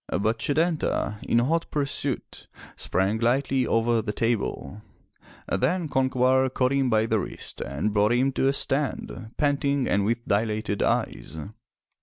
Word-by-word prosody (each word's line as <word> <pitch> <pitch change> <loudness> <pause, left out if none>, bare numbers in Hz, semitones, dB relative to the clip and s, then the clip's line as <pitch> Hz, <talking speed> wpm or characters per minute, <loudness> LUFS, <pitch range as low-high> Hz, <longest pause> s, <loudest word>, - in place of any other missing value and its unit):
But 110 +5 0
Setanta, 155 - 0
in - - +1
hot 160 +8 +1
pursuit, 140 -2 -2 0.3
sprang 95 +4 0
lightly 130 +2 +1
over 115 0 +2
the 105 -1 -3
table. 105 - -2 0.7
Then 180 -1 0
Concobar 130 -1 +2
caught 125 0 +1
him 135 -2 +2
by 110 -1 +3
the 110 -1 +1
wrist - - -7
and 75 - -2
brought 105 +1 +3
him 130 +3 +2
to 135 - +1
a 135 - +3
stand, 135 -5 -1
panting 140 -2 +1
and 100 - +2
with 115 +3 -1
dilated 105 0 0
eyes. - - -1
120 Hz, 140 wpm, -25 LUFS, 110-135 Hz, 0.7 s, by